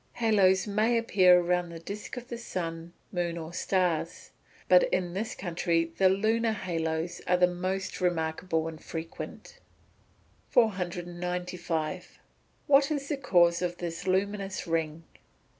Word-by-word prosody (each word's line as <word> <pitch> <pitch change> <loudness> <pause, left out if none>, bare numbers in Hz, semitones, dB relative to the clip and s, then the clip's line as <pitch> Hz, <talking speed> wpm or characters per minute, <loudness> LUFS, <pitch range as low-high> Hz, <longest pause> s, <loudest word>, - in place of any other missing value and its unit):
Haloes 200 -5 +3
may 215 +3 +2
appear 185 -6 +5
around 180 0 0
the 170 - -8
disc 200 +8 -7
of 245 0 -7
the 235 - -4
sun, 165 -6 -5 0.2
moon, 175 -2 -2
or 165 0 -7
stars. 180 -4 -1 0.4
But - - +7
in 175 -2 0
this 215 +4 -3
country 170 -2 -1
the 190 -1 +6
lunar 220 +4 +1
haloes 165 -3 -3
are 180 - +4
the 180 - +6
most 185 +2 -3
remarkable 160 -1 0
and 160 -1 -8
frequent. 165 - -7 0.9
495. 180 -4 -1 0.5
_What 275 0 +5
is 285 -3 -3
the 295 - -1
cause 175 -10 +3
of 175 -1 -2
the 170 -2 -4
luminous 195 +1 -1
ring? 165 -1 -2
180 Hz, 130 wpm, -29 LUFS, 170-200 Hz, 0.9 s, But